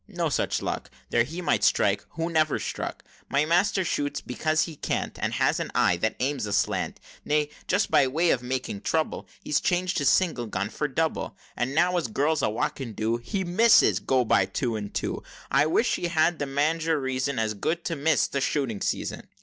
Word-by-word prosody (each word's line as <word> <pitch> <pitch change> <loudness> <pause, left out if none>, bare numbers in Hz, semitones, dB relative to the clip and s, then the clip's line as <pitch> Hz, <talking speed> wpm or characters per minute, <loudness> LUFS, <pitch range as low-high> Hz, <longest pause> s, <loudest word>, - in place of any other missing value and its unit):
no - - -2
such - - -1
luck! - - -3 0.2
There 120 - +4
he 165 +8 -6
might - - +1
strike, - - +3
who 165 +2 -3
never 155 -2 +2
struck! - - -5 0.3
My 140 +2 +2
master 180 +3 +2
shoots 145 -3 -1
because 155 +5 0
he 165 - -6
can't, - - -3
And - - -1
has - - +2
an - - -3
eye - - +3
that - - -1
aims 130 -4 -1
aslant; 100 -1 -1 0.2
Nay, 150 0 0 0.2
just 200 +3 +1
by 135 - +5
way 160 +6 +2
of 125 - +1
making 125 -5 -3
trouble, 160 -1 -1 0.2
He's 150 - +1
changed 180 0 0
his 145 - +3
single 160 -11 +1
gun 100 0 -3
for 150 - -2
double; 160 +3 -2 0.2
And 130 +3 -2
now, 180 +2 +3
as 170 - 0
girls 145 +7 +1
a - - +2
walking 115 +2 -3
do, 110 +3 0
His 190 +11 -3
misses 175 - +5
go 125 +4 +1
by 100 - +3
two 115 +4 -2
and 105 -1 -5
two! - - -3 0.3
I 150 - +4
wish 225 +9 +2
he 175 - -2
had 170 0 +2
the 145 - -2
mange, 155 +4 0
or 160 -2 +2
reason 130 0 -2
As 110 -1 0
good, 165 +11 -2
to 165 - -1
miss 155 +1 +2
the 140 - -2
shooting 130 -8 -1
season!" - - -3
145 Hz, 205 wpm, -26 LUFS, 125-165 Hz, 0.3 s, by